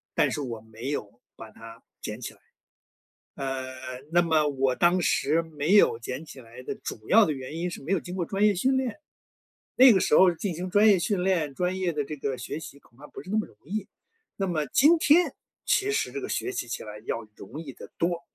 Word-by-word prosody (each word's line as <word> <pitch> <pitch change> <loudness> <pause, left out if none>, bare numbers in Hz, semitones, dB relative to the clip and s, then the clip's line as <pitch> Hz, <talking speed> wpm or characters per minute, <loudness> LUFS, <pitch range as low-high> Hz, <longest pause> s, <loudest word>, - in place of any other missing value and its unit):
但 - - +3
是 150 - -3
我 120 -5 -5
没 110 +3 -8
有 120 -4 -5
把 110 - -11
它 115 0 -13 0.2
捡 105 +2 -5
起 125 - -6
来。 - - -25 1.0
呃， 135 -1 -4 0.4
那 175 +1 +4
么 155 -3 +2
我 135 -2 +1
当 175 +4 +3
时 160 -1 +2
没 160 +3 -1
有 160 - +5
捡 130 +6 -5
起 135 - -11
来 115 +1 -13
的 - - -4
主 110 -1 -8
要 220 +1 +7
的 155 - 0
原 130 +1 -7
因 175 +1 -2
是 - - -7
没 160 - -3
有 195 - +2
经 180 +3 -7
过 175 -3 -2
专 195 +3 0
业 210 - +5
训 260 +8 +2
练， 260 -4 -1 0.8
那 255 0 +9
个 195 - +4
时 - - +2
候 185 +1 +7
进 180 +2 -3
行 180 +3 -5
专 205 +3 +5
业 195 -4 +6
训 180 0 0
练， 165 -7 0
专 180 +3 -1
业 185 -2 0
的 150 -2 -2
这 150 - -6
个 135 -2 -3
学 140 +5 -5
习 140 - -10
恐 130 -2 -25
怕 150 - -11
不 - - -10
是 190 - -9
那 215 - +1
么 215 - -3
容 - - -22
易。 200 +4 -4 0.5
那 195 - -1
么 155 -5 -1
今 310 - +5
天， 330 +3 +4 0.3
其 410 +1 +2
实 445 - -1
这 410 - -5
个 395 - -5
学 385 - -2
习 - - -4
起 115 - -5
来 105 0 -9
要 115 -2 -3
容 130 +10 -9
易 140 -5 -8
得 - - -12
多。 170 0 0
165 Hz, 255 characters per minute, -27 LUFS, 130-195 Hz, 1.0 s, 那